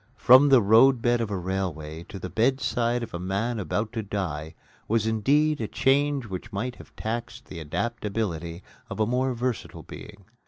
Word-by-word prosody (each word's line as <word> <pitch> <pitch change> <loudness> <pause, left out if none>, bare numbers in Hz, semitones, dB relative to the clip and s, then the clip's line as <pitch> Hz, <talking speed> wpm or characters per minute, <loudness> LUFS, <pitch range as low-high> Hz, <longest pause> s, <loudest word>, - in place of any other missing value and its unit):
From 130 +7 +7
the 130 -5 +6
roadbed 120 +2 +5
of 115 - -2
a 100 - -2
railway 85 -4 -4
to - - -9
the 90 - -5
bedside 120 +1 0
of 115 - -8
a 85 - -4
man 100 +6 -2
about 105 +3 -2
to 115 - -2
die 80 -7 -4 0.3
was 110 0 +1
indeed 140 +7 +2
a 110 - -2
change 140 +1 +1
which 100 +2 -7
might 120 +5 -4
have - - -15
taxed 120 +1 -5
the 90 - -9
adaptability 90 -1 -3 0.3
of - - -6
a 110 - +3
more 125 +2 0
versatile 125 0 -4
being. 100 -2 -11
110 Hz, 170 wpm, -26 LUFS, 95-120 Hz, 0.3 s, From